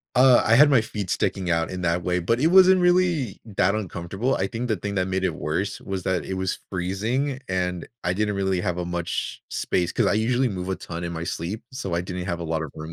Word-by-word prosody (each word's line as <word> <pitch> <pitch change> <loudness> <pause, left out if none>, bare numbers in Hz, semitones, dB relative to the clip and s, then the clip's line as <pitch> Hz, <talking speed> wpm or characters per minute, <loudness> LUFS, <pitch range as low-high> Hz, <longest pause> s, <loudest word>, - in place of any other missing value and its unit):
Uh, 125 -1 +6
I 110 - +4
had 145 +2 +7
my 130 -4 +5
feet 105 -4 -5
sticking 95 -2 -1
out 85 -1 +1
in 90 0 -5
that 85 0 +1
way, 90 +1 0
but 115 +8 0
it 155 - +4
wasn't 185 +1 +7
really 175 - +2
that 100 -2 +1
uncomfortable. 100 +4 -2
I 95 - 0
think 120 +3 -4
the 110 -3 0
thing 100 +2 -4
that 95 0 +1
made 95 0 -1
it 95 - 0
worse 95 +6 -2
was 95 -2 -4
that 90 -5 0
it 95 - -4
was 95 0 -2
freezing, 110 +10 -1
and 90 -2 -2 0.2
I 90 - 0
didn't 105 +1 0
really 95 -2 0
have 90 0 -2
a 90 - -2
much 85 -1 -3
space, 90 -1 -1
'cause - - +1
I - - +2
usually 120 +4 +2
move 95 -3 -4
a 95 - -1
ton 85 0 -6
in 85 - -4
my 80 0 -4
sleep, 90 +4 -4
so 115 -9 -4
I 85 - +1
didn't 90 0 -5
have 85 -3 -2
a - - -4
lot 80 0 -1
of 80 - -6
room 80 +1 -7
95 Hz, 250 wpm, -24 LUFS, 90-115 Hz, 0.2 s, had